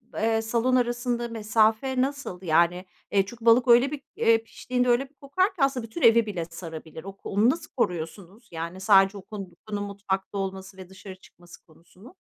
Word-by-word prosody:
eee, 225 Hz, 0 st, +1 dB
salon 235 Hz, +3 st, +1 dB
arasında 240 Hz, -1 st, 0 dB
mesafe 225 Hz, +3 st, +1 dB
nasıl? 275 Hz, -9 st, -3 dB
Yani, 175 Hz, +1 st, +2 dB, 0.3 s
eee, 195 Hz, -1 st, +3 dB
çünkü 230 Hz, +3 st, -11 dB
balık 240 Hz, +2 st, +5 dB
öyle 245 Hz, +3 st, +5 dB
bir, 290 Hz, -2 st, -5 dB
eee, 225 Hz, 0 st, +3 dB
piştiğinde 250 Hz, +2 st, -2 dB
öyle 265 Hz, +3 st, +2 dB
bir -, -, -34 dB
kokar 290 Hz, +8 st, 0 dB
ki 330 Hz, -, -1 dB
aslında 265 Hz, -4 st, 0 dB
bütün 230 Hz, +9 st, -8 dB
evi 230 Hz, 0 st, +6 dB
bile 185 Hz, -6 st, -4 dB
sarabilir. 165 Hz, -1 st, -9 dB
Ok 195 Hz, 0 st, -11 dB
onu 210 Hz, +4 st, +2 dB
nasıl 320 Hz, +3 st, -3 dB
koruyorsunuz, 185 Hz, +2 st, -4 dB
yani 170 Hz, +3 st, -6 dB
sadece 195 Hz, 0 st, +4 dB
o -, -, -8 dB
kokunun 205 Hz, +1 st, -7 dB
mutfakta 200 Hz, -1 st, -4 dB
olması 190 Hz, 0 st, -5 dB
ve 185 Hz, -1 st, -11 dB
dışarı 190 Hz, 0 st, -11 dB
çıkması 175 Hz, -2 st, -18 dB
konusunu? 175 Hz, -, -18 dB
210 Hz, 175 wpm, -26 LUFS, 190-240 Hz, 0.3 s, evi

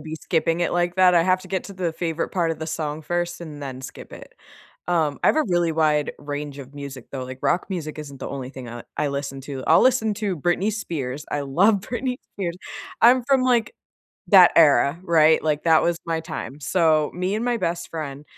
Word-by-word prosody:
be 160 Hz, 0 st, -7 dB
skipping 165 Hz, +1 st, 0 dB
it -, -, 0 dB
like 175 Hz, 0 st, 0 dB
that, 185 Hz, -1 st, +5 dB
I 170 Hz, -, +5 dB
have 185 Hz, +1 st, +2 dB
to 185 Hz, -, -12 dB
get 190 Hz, -1 st, -2 dB
to 200 Hz, -, -9 dB
the 180 Hz, -3 st, -2 dB
favorite 165 Hz, 0 st, -3 dB
part 170 Hz, -3 st, 0 dB
of 165 Hz, -, -4 dB
the 160 Hz, -, -5 dB
song 155 Hz, -1 st, -4 dB
first 175 Hz, +2 st, -2 dB
and 150 Hz, -4 st, -8 dB
then 130 Hz, -2 st, -6 dB
skip 130 Hz, -, -10 dB
it. -, -, -12 dB, 0.5 s
Um, 160 Hz, -5 st, 0 dB
I -, -, +6 dB
have -, -, +3 dB
a 310 Hz, -, +3 dB
really 175 Hz, -2 st, +1 dB
wide 155 Hz, -2 st, +1 dB
range 145 Hz, -1 st, -6 dB
of 140 Hz, 0 st, -11 dB
music 140 Hz, -3 st, -8 dB
though, 130 Hz, -2 st, -5 dB
like 130 Hz, 0 st, -8 dB
rock 175 Hz, -, +1 dB
music 155 Hz, -4 st, -5 dB
isn't 140 Hz, -3 st, -9 dB
the -, -, -5 dB
only 130 Hz, -2 st, -6 dB
thing 130 Hz, -3 st, -9 dB
I 120 Hz, 0 st, -8 dB
I 150 Hz, -, 0 dB
listen 140 Hz, -1 st, -4 dB
to, 135 Hz, -1 st, -6 dB
I'll -, -, +6 dB
listen 235 Hz, -4 st, +3 dB
to 200 Hz, -4 st, -2 dB
Britney 175 Hz, +7 st, 0 dB
Spears, 150 Hz, -, -4 dB
I 145 Hz, -, -1 dB
love 190 Hz, +10 st, +3 dB
Britney 250 Hz, +4 st, -3 dB, 0.2 s
Spears, 175 Hz, -4 st, -4 dB, 0.4 s
I'm 245 Hz, +2 st, +6 dB
from 270 Hz, 0 st, +3 dB
like, 250 Hz, -, +1 dB, 0.5 s
that 185 Hz, -4 st, +8 dB
era, 150 Hz, -1 st, +5 dB
right? 160 Hz, -3 st, +4 dB
Like, 150 Hz, -1 st, 0 dB
that 160 Hz, -2 st, +5 dB
was 170 Hz, -1 st, 0 dB
my 165 Hz, -1 st, -1 dB
time. 155 Hz, -5 st, -7 dB
So, 155 Hz, -1 st, +2 dB
me 180 Hz, +3 st, -1 dB
and 225 Hz, -, -2 dB
my 245 Hz, -1 st, 0 dB
best 170 Hz, -3 st, -3 dB
friend, 150 Hz, -3 st, -6 dB
165 Hz, 220 wpm, -23 LUFS, 145-185 Hz, 0.5 s, that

